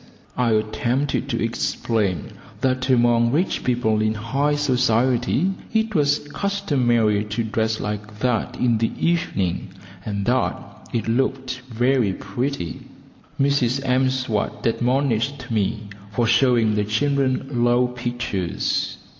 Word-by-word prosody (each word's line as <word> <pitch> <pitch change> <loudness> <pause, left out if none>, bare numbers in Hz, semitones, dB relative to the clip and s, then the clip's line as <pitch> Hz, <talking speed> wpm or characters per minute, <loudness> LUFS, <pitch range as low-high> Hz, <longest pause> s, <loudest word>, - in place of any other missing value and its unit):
I 120 -3 +2
attempted 125 +6 0
to - - -1
explain 105 -6 -1 0.3
that 130 0 0
among 120 -2 +4
rich 165 +8 0
people 120 -4 +1
in 110 0 +1
high 135 +7 0
society 130 +3 +2 0.2
it 220 0 +1
was 145 -3 +1
customary 125 - +1
to 105 +2 -2
dress 110 0 -1
like 105 0 -5
that 120 -1 -1
in 120 -3 +2
the 115 - +1
evening, 165 - 0 0.4
and 100 -2 -3
that 125 +2 +1 0.3
it 115 - -2
looked 130 +1 -1
very 120 -3 +2
pretty. 120 - -4 0.6
Mrs 135 -1 +1
M'Swat 130 -4 0
admonished 125 +1 0
me 110 0 0 0.3
for 115 +3 +1
showing 120 -1 +3
the 105 0 +1
children 135 +2 0
low 120 +1 +4
pictures. 120 -7 -2
120 Hz, 115 wpm, -22 LUFS, 110-135 Hz, 0.6 s, among